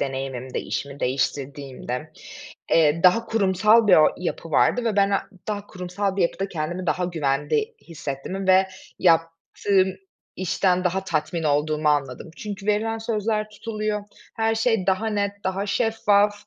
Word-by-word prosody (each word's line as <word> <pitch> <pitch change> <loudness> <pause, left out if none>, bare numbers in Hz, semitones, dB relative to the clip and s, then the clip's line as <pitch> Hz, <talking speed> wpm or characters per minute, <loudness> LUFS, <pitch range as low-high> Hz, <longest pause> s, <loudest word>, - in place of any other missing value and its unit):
deneyimimde, 135 -1 -3
işimi 140 0 -5
değiştirdiğimde, 135 +1 -3 0.6
eee, 160 0 +4
daha 185 +6 +5
kurumsal 210 +1 +3
bir 190 - +7
o 155 - +7
yapı 170 -2 -4
vardı 240 +10 +3
ve 215 -3 0
ben 200 0 +4
a 195 - +1 0.3
daha 205 -1 -3
kurumsal 185 +2 -3
bir 190 - +2
yapıda 195 +3 -1
kendimi 175 +2 -4
daha 180 +4 0
güvende 160 - -1
hissettiğimi 165 +4 -5
ve 190 +1 +6 0.3
yaptığım 175 +3 +2 0.4
işten 185 0 +1
daha 190 +2 0
tatmin 160 0 -2
olduğumu 150 +1 +1
anladım. 145 +1 -1
Çünkü 205 -1 -7
verilen 225 +2 +1
sözler 215 -1 -1
tutuluyor, 215 -1 -3 0.3
her 225 0 +1
şey 225 -4 +1
daha 195 +4 +1
net, 205 -2 0
daha 190 +2 -1
şeffaf, 210 -1 +2
185 Hz, 140 wpm, -24 LUFS, 155-210 Hz, 0.6 s, bir